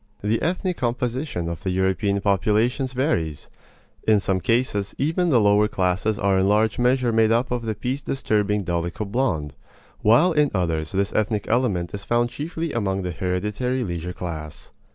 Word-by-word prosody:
The 110 +2 +1
ethnic 180 +1 -1
composition 120 - -2
of 85 -1 -5
the 95 - -2
European 95 +2 0
populations 110 +7 +1
varies. 105 - -1 0.6
In 110 -1 +5
some 95 -1 0
cases 115 -3 0
even 165 +5 +1
the 130 -6 +4
lower 105 0 +4
classes 95 +2 0
are 100 -1 +2
in 95 - +2
large 110 +3 +2
measure 125 0 +2
made 110 0 +3
up 120 +3 +1
of 120 -2 -2
the 110 - -1
peace 130 +6 -3
disturbing 105 -6 0
dolicho 85 +4 -2
blond; 100 - -1 0.5
while 120 +12 +5
in 150 -3 +3
others 80 -4 -1
this 100 0 -1
ethnic 105 -1 0
element 110 -8 0
is 100 0 -5
found 120 +2 +1
chiefly 160 +3 -4
among 95 -4 -1
the 90 - -3
hereditary 105 +9 -2
leisure 85 -3 -4
class. 80 -4 -7
105 Hz, 165 wpm, -23 LUFS, 95-125 Hz, 0.6 s, In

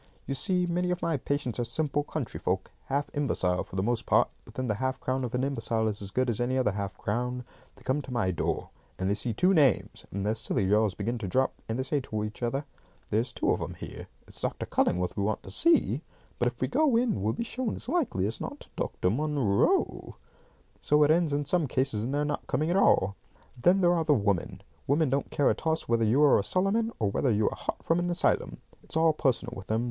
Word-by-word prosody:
"You 135 - -2
see, 180 +5 +1
many 175 +1 0
of 180 0 -2
my 165 -1 +1
patients 140 -3 -2
are - - +1
simple 145 +4 -1
country 145 -4 -5
folk, 95 +1 -2
half 145 +2 -1
imbecile 95 -11 +1
for - - -12
the 95 - 0
most 120 +2 -1
part, - - +4
but - - -15
then 130 - -2
the 110 - 0
half 130 0 -1
crown 130 +1 -1
of 125 -1 -3
an 125 - 0
imbecile 115 -5 0
is 105 -1 -3
as 100 - -5
good 130 +6 0
as 120 -1 -1
any 130 +2 0
other 125 -5 +2
half 100 -2 -4
crown. 125 +3 -2 0.3
They - - -19
come 135 +3 0
to 130 - -10
my 115 -7 +1
door, 85 - -2 0.3
and 95 - -1
they 100 - +2
see 115 +3 -1
two 180 - +3
names, 140 - +2
and 100 +1 -3
their 105 - +2
silly 100 -3 -1
jaws 105 -1 +3
begin 115 +4 -2
to 100 - -4
drop, 130 +7 +1 0.2
and 110 - -1
they 130 - 0
say 145 +2 0
to 110 -5 -3
each 105 +2 -6
other, 135 +4 -1 0.5
'There's 115 +4 +1
two - - 0
of - - 0
'em - - -4
here. - - -8 0.2
It's - - -4
Dr. - - -2
Cullingworth 90 0 0
we 100 - -1
want 105 +2 -1
to - - -9
see, 335 0 +3 0.4
but - - +2
if - - -4
we - - +2
go 305 -6 +2
in 235 - +1
we'll 110 +3 +1
be - - -3
shown 240 0 -3
as - - -7
likely 265 - 0
as 110 +3 -3
not - - -6
to - - -12
Dr. 90 - -1
Munro.' 140 -6 +1 0.7
So 150 0 +4
it 150 - +4
ends 165 -1 +3
in 145 0 0
some 160 +1 +1
cases 130 -5 0
in 120 - -2
their 145 +1 0
not 145 0 -3
coming 155 +3 0
at - - +1
all. 100 - +4 0.4
Then 175 +10 +3
there 175 -1 +5
are 165 -2 +1
the 150 -2 +4
women. 100 -6 -1 0.2
Women 145 0 +2
don't 140 +1 0
care 145 - +2
a - - +2
toss 160 0 -1
whether 115 -1 +2
you 125 +7 +4
are 145 - +6
a - - -1
Solomon, 195 - +1
or 105 -3 0
whether 130 - +1
you 105 0 +2
are - - -5
hot - - -5
from 165 +1 +2
an 175 0 -1
asylum. 175 - +1 0.2
It's - - -5
all 160 -1 +4
personal 130 -4 0
with 95 - -9
them. 110 +1 +1
130 Hz, 245 wpm, -28 LUFS, 110-155 Hz, 0.7 s, are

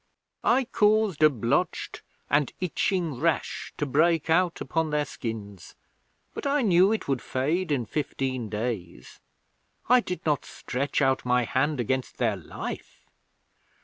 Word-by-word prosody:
I 260 +3 +4
caused 215 - +2
a 155 - +8
blotched 135 - -1 0.3
and 145 -1 +2
itching 175 -5 -1
rash 165 +1 -1
to 150 - -1
break 160 +3 +2
out 175 0 +2
upon 160 -1 -1
their 150 0 0
skins, 105 -7 -7 0.6
but - - -4
I 280 -1 +2
knew 190 -1 +5
it 220 - -2
would 135 -3 0
fade 155 +7 -1
in 130 -5 0
fifteen 130 -3 -3
days. 105 - -5 0.7
I 250 +1 +7
did 180 -6 -5
not 150 -3 +1
stretch 140 +3 -2
out 135 0 +2
my 125 0 +2
hand 135 +4 0
against 130 +2 -2
their 115 -4 +1
life. 90 -5 -8
145 Hz, 140 wpm, -26 LUFS, 125-175 Hz, 0.7 s, a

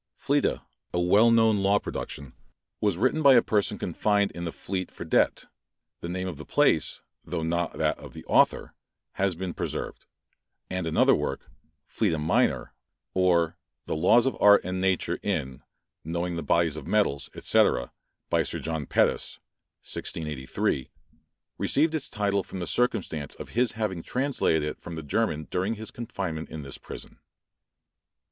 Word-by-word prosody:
Fleta, - - +1 0.3
a - - +2
well 100 +6 +5
known 110 -2 +4
law 100 +1 +3
production, 70 -8 -6 0.5
was 100 -5 +1
written 130 - +2
by 140 -3 +7
a 120 - +7
person 105 -2 0
confined 100 -1 +1
in 85 0 -6
the 85 - -3
Fleet 95 +1 -4
for - - -8
debt; - - +2 0.5
the 85 - -6
name 90 +1 -3
of 90 -5 -5
the 75 - -8
place, - - +2 0.2
though 80 - -3
not 85 +1 -1
that - - 0
of - - -11
the - - -10
author, - - +3 0.4
has 95 -1 0
thus - - -16
been 95 -2 -3
preserved; - - -5 0.6
and 95 -2 -2
another 80 - +4
work, - - -3 0.4
"Fleta 80 - 0
Minor, 75 - +1 0.4
or 90 -2 +2 0.3
the - - -2
Laws 95 +10 +5
of 135 - 0
Art 100 0 +7
and 90 +1 -3
Nature 95 -2 0
in, 75 -11 -2 0.4
knowing 85 +2 -2
the 85 - -3
bodies 80 +1 +2
of 75 - -8
Metals, 100 -10 +1
&c. - - +4 0.6
by - - +2
Sir - - -2
John 80 -3 -3
Pettus, - - +1 0.5
1683;" 70 -4 -2 0.7
received 155 +3 +2
its 155 -4 -2
title 100 -3 0
from 95 - -8
the 90 - -3
circumstance 95 - -1
of - - -9
his 120 0 +1
having 105 -6 -2
translated 125 - 0
it 75 - -4
from 85 - -7
the 80 - -6
German 80 -1 -1
during 95 +5 0
his 110 0 -4
confinement 95 -9 -5
in 80 -2 -7
this 70 -1 -6
prison. - - -10
90 Hz, 160 wpm, -27 LUFS, 80-105 Hz, 0.7 s, by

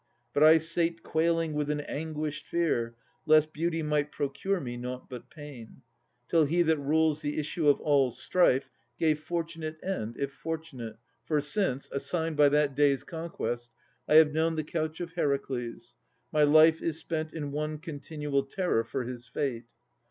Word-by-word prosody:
But 145 - +1
I 155 +1 +8
sate 165 +1 -1
quailing 165 0 +1
with 150 -1 -1
an 150 0 0
anguished 155 0 -4
fear, 120 -9 0 0.3
Lest 155 0 +5
beauty 165 0 -1
might 150 -1 0
procure 180 +8 -1
me 120 -5 -5
nought 125 +1 -6
but 125 -3 -9
pain, 145 -7 -11 0.4
Till 165 -2 +4
He 170 +4 +2
that 160 -2 +2
rules 155 +2 +2
the 145 0 -3
issue 155 0 +1
of 145 - +4
all 140 -3 +3
strife, 135 -1 +2 0.3
Gave 155 -2 +2
fortunate 165 -1 -4
end 120 - -3
if 140 0 -3
fortunate! 155 -9 -6 0.3
For 155 -2 +2
since, 145 -2 -1
Assigned 160 +4 -1
by 145 -1 +6
that 145 -1 +2
day's 140 -2 +3
conquest, 145 -7 -4 0.4
I 150 - +3
have 155 -1 +7
known 160 +1 +1
The 155 - -1
couch 155 +1 -3
of 170 -1 -5
Heracles, 125 -6 -2 0.4
my 155 - +2
life 155 +2 +6
is 160 -2 -1
spent 160 -1 -3
In 145 -3 -5
one 150 +1 -2
continual 150 -2 -3
terror 135 -3 0
for 130 +3 -3
his 120 0 -7
fate. 125 -3 -3
150 Hz, 165 wpm, -29 LUFS, 140-160 Hz, 0.4 s, I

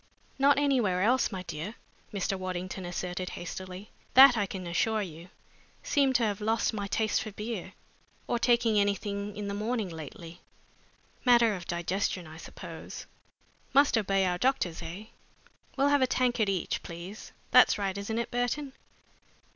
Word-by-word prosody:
"Not 280 +1 +5
anywhere 245 -11 +2
else, 245 +3 +3
my 185 -2 -5
dear," 180 +6 -6 0.4
Mr. 195 -1 -1
Waddington 185 0 -4
asserted, 180 +1 -4
hastily, 185 +3 -7 0.2
"that 265 -1 +10
I 205 -3 0
can 185 -1 -6
assure 210 +5 +1
you. 170 0 -9 0.5
Seem 280 -3 +2
to 245 - +3
have 210 -1 -1
lost 225 +2 +1
my 205 -2 -3
taste 215 +1 +1
for - - -5
beer, 210 -2 -5 0.5
or 240 - -1
taking 235 -3 +3
anything 200 0 -1
in 205 -1 -4
the 200 - -3
morning 215 0 -2
lately. 165 +1 -9 0.8
Matter 235 -3 +5
of 180 -3 -7
digestion, 180 +1 -1
I 155 0 -11
suppose. - - -9 0.7
Must 280 -1 +5
obey 195 -3 +2
our 180 -1 0
doctors, 185 -11 0
eh? 175 +6 -7 0.7
We'll 275 +2 +3
have 285 -1 +3
a 260 - +4
tankard 245 -4 +1
each, 185 -4 -1
please. 175 +5 -9 0.2
That's 250 -1 +7
right, 195 -2 -2
isn't 200 +3 -3
it, 235 - -2
Burton?" 245 +3 -1
205 Hz, 155 wpm, -29 LUFS, 185-235 Hz, 0.8 s, that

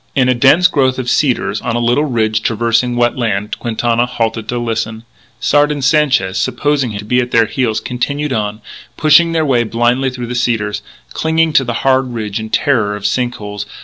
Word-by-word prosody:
In 130 -2 +3
a - - +4
dense 135 +8 +4
growth 130 -7 +2
of 125 -2 -2
cedars, 135 -5 0
on 120 -2 -2
a - - 0
little 120 +5 +1
ridge 110 -5 0
traversing 115 +2 0
wet 120 +1 +1
land, 105 -3 -2
Quintana 120 +1 0
halted 115 -2 -3
to 125 - -2
listen. 115 -1 -3 0.4
Sard 145 +1 +2
and 145 -2 -4
Sanchez, 135 -11 +2
supposing 130 +4 0
him 105 - -5
to 105 - -7
be 125 +4 +1
at 125 -1 -1
their 115 -2 +3
heels, 110 -1 -1
continued 140 +3 -3
on, 105 -1 -3 0.4
pushing 160 +2 +5
their 160 -1 0
way 125 -4 +2
blindly 120 +3 0
through 125 -1 -6
the 120 - -5
cedars, 110 -4 -1 0.3
clinging 160 0 +1
to 135 - +4
the 120 -2 -3
hard 130 -2 +2
ridge 105 -2 -3
in 110 0 -6
terror 110 -5 +1
of 105 -1 -8
sink 125 +4 0
holes. 105 -1 -7
120 Hz, 200 wpm, -15 LUFS, 110-135 Hz, 0.4 s, pushing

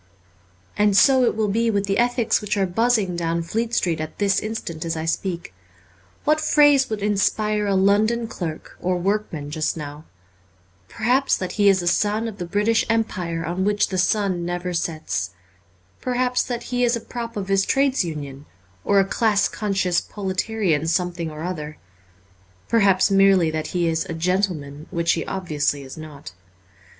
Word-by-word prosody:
And 205 -1 +4
so 260 0 +6
it - - +1
will 215 -1 0
be 230 +3 +1
with 200 -2 0
the 195 +2 0
ethics 240 -1 +2
which 210 0 -2
are 195 - +2
buzzing 210 -1 +1
down 170 0 -1
Fleet 225 +7 -2
Street 165 -3 0
at 155 - -6
this 200 -1 +2
instant 210 -7 -5
as 165 -1 -3
I 160 - -3
speak. 170 - -3 0.7
What 305 +1 +2
phrase 290 -3 +4
would 215 -2 -3
inspire 210 +1 +1
a 200 - +1
London 215 +4 +2
clerk 165 -7 -6
or 180 0 0
workman 175 -6 -2
just 155 +1 -1
now? 150 0 -8 0.8
Perhaps 250 +5 +1
that 185 - -4
he 205 -1 +3
is 190 -2 +3
a - - -3
son 210 +5 +1
of 215 -2 -8
the 175 - -4
British 210 +5 +2
Empire 180 -7 -1
on 175 +3 -2
which 205 +1 +1
the 185 - -1
sun 185 -2 +1
never 175 +1 -3
sets; 155 - -3 0.7
perhaps 250 0 0
that 240 -1 -4
he 245 0 +1
is 240 0 +3
a - - -3
prop 230 0 -6
of 195 -2 -3
his 195 0 +2
Trades 270 0 +2
Union, 145 -4 -7 0.4
or 200 - +3
a 195 - +3
class 210 0 +2
conscious 190 -4 0
proletarian 190 -5 -1
something 175 -1 -1
or 155 0 -8
other; 155 -4 -5 0.9
perhaps 200 -3 +3
merely 195 -4 +4
that 155 0 -3
he 175 -2 0
is 160 +2 0
a 170 -3 -5
gentleman, 165 -4 -2
when 170 -2 -2
he 170 - +2
obviously 150 -6 -1
is 130 - -9
not. 150 - -10
195 Hz, 170 wpm, -22 LUFS, 165-215 Hz, 0.9 s, so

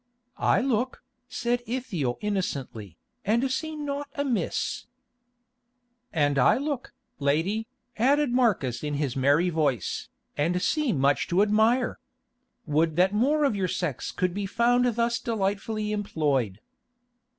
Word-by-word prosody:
"I - - +3
look," 255 -1 -1 0.3
said 245 0 -1
Ithiel 200 - -2
innocently, 135 - -3 0.3
"and 235 +6 +1
see 315 +4 -2
naught 290 -1 -4
amiss." 255 - -1 1.2
"And 145 -3 +2
I 125 - +5
look, 280 -2 -3 0.3
lady," 165 +11 0 0.3
added 280 +3 +3
Marcus 200 - +1
in 150 -1 -2
his 140 -3 -1
merry 145 +7 +3
voice, 145 - -1 0.3
"and 170 +5 +1
see 295 +7 +1
much 140 -3 +2
to 185 +4 +3
admire. 220 +4 +2 0.7
Would 155 +1 +1
that 185 +3 +3
more 285 +8 +2
of 275 -7 +2
your 190 -2 0
sex 165 -7 -3
could 180 -2 -1
be 200 +1 -3
found 240 +4 +3
thus 235 0 +1
delightfully 210 0 -2
employed." 145 - -1
205 Hz, 125 wpm, -26 LUFS, 150-245 Hz, 1.2 s, I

